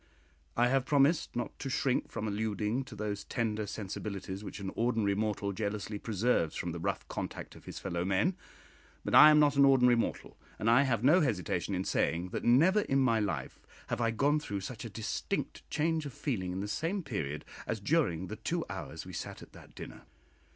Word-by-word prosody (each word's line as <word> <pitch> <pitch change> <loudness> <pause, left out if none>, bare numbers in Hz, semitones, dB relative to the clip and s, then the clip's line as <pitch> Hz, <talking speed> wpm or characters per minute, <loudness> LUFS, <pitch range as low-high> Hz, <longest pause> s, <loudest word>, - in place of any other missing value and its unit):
I 120 +1 +4
have 135 0 +1
promised 150 +3 +3
not 120 - -4
to 135 - -4
shrink 130 -1 0
from 110 -1 -4
alluding 105 +4 -1
to - - -10
those 105 -1 -3
tender 110 -3 -2
sensibilities 100 -1 -5
which - - -7
an 95 -1 -4
ordinary 115 -4 +1
mortal 105 -1 -1
jealously 105 0 -3
preserves 105 -6 0
from 85 - -3
the 85 - -5
rough - - -2
contact - - -6
of - - -15
his - - -7
fellow 85 -3 -2
men; 95 - +1 0.7
but - - -2
I 155 - +10
am 150 - +6
not 145 -1 +4
an 140 - +7
ordinary 125 -3 +6
mortal, 115 - -3 0.2
and 115 - +2
I 120 - +6
have 125 -5 +1
no 155 +8 +6
hesitation 95 - -1
in 95 - -1
saying, 85 +2 0
that - - -4
never 165 - +5
in 135 - 0
my 130 -4 +3
life 100 -4 -3 0.3
have - - -1
I 115 - +2
gone 140 +7 +2
through 100 -9 -4
such 110 +3 -6
a - - -5
distinct 110 +2 -4
change 160 0 0
of 135 - -9
feeling 95 -11 -2
in 95 +1 -3
the 100 - -3
same 170 - -2
period 75 - -4 0.2
as 110 - -2
during 100 - +1
the 105 +3 -7
two 165 +9 -2
hours 85 -3 -6
we 90 - -9
sat - - -6
at - - -16
that - - -15
dinner. - - -9
110 Hz, 200 wpm, -31 LUFS, 100-135 Hz, 0.7 s, I